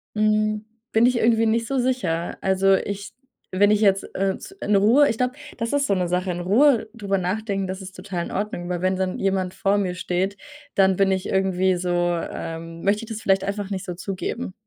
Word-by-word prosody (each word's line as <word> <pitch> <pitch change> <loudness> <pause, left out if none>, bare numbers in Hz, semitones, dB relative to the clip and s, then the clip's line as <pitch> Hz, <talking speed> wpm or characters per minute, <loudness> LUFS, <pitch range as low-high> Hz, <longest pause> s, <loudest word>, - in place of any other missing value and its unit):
Hm, 215 0 +1 0.3
bin 225 +2 +4
ich 250 0 +3
irgendwie 225 0 +3
nicht 230 +1 +1
so 275 - -1
sicher. 235 -10 -1
Also, 190 0 +3
ich 200 +1 -4 0.4
wenn 205 +2 +4
ich 210 0 +2
jetzt, 195 -2 +4
äh 195 0 0
z 390 - -12
in 205 - +1
Ruhe 230 +9 +5
ich 225 - -1
glaube, 250 +1 0 0.2
das 230 -1 -2
ist 285 -1 +2
so 200 - +2
'ne 180 -2 0
Sache 180 +1 0
in 175 - -4
Ruhe 230 +6 +3
darüber 200 -4 -1
nachdenken, 195 +1 -2
das 190 +1 -5
ist 190 0 -10
total 185 -2 -4
in - - -8
Ordnung, 195 -3 -3
weil 180 -1 -2
wenn 185 0 +1
dann 185 -1 -2
jemand 190 -2 0
vor 200 +1 +1
mir 190 -3 0
steht, 185 +2 -2 0.4
dann 190 -1 +4
bin 195 -1 +3
ich 190 -1 -1
irgendwie 190 -1 +2
so, 180 0 -3
ähm 165 -1 -2
möchte 205 +3 +1
ich - - -15
das 220 -1 -5
vielleicht 195 -2 +2
einfach 200 0 -3
nicht 190 -2 -4
so 180 - -4
zugeben. 195 +5 -4
195 Hz, 215 wpm, -23 LUFS, 185-215 Hz, 0.4 s, Ruhe